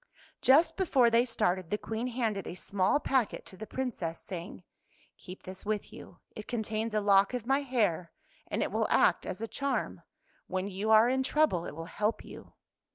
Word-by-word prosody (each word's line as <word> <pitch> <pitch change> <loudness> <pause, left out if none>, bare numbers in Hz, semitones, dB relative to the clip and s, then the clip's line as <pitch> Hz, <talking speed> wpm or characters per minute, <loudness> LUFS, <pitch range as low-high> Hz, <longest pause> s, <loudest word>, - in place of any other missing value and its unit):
Just 320 +5 +5
before 270 -11 +3
they 235 +1 +4
started, 185 -7 -1
the 210 - 0
Queen 225 +3 -4
handed 225 -5 -2
a 175 - -6
small 195 +7 +1
packet 260 -6 0
to - - -11
the 220 +3 -8
Princess, 205 -10 -4
say 180 -3 -6
ing, 200 - -12 0.3
" - - -34
Keep 185 0 -11
this 185 0 -8
with 210 -1 -3
you. 175 - -12 0.2
It 215 - -8
contains 220 -2 -2
a 215 - +2
lock 200 +3 +4
of 240 -3 -4
my 270 +2 +2
hair, 210 - 0 0.4
and - - -1
it - - -3
will - - +1
act - - +3
as 190 - -5
a 225 - -2
charm. 275 +4 -2 0.5
When 185 +1 -2
you 200 +2 -3
are 220 +1 +7
in 260 +1 +1
trouble 265 - +1
it - - -8
will 165 +1 -6
help 210 +5 -2
you." - - -12
215 Hz, 200 wpm, -30 LUFS, 190-250 Hz, 0.5 s, are